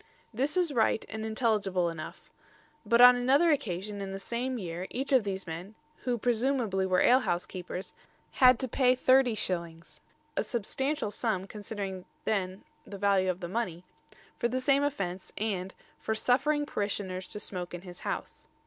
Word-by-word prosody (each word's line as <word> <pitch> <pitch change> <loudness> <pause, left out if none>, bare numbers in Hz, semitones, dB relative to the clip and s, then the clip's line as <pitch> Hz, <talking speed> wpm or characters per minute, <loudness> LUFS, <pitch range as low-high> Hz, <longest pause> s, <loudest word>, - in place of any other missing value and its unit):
This 275 +9 0
is 345 -5 +2
right 225 -2 +2
and 220 0 -5
intelligible 215 -5 +1
enough; 165 -2 -7 0.5
but 235 +2 +4
on 250 0 +10
another 275 +7 +4
occasion 205 - -2
in 195 -1 -4
the 195 - -4
same 240 +6 -2
year 180 -2 -5
each 270 +2 -2
of 255 -4 +5
these 195 -1 -3
men, 175 +5 -7 0.3
who 245 -2 +1
presumably 230 -5 +1
were 185 -1 +3
ale 250 +2 +6
house 175 -8 -1
keepers, 180 +1 -6 0.4
had 255 -2 +6
to 260 - -1
pay 255 +1 +3
30s. 200 -11 +1 0.3
a - - +1
substantial 260 +2 -2
sum 210 -5 -1
considering 200 -2 -5
the 180 - -16 0.3
then 190 -2 -2 0.2
value 200 -2 +1
of 180 -1 -2
money 180 -4 -3 0.6
for 235 - +2
the 255 +2 -1
same 275 +2 +3
offence 195 -11 -3
and 195 -3 -2 0.2
"for 220 - -2
suffering 290 +6 +2
parishioners 200 -6 -3
to 210 - -6
smoke 180 -4 -5
in 175 - -9
his 180 -2 -10
house." - - -5
210 Hz, 160 wpm, -30 LUFS, 185-250 Hz, 0.6 s, on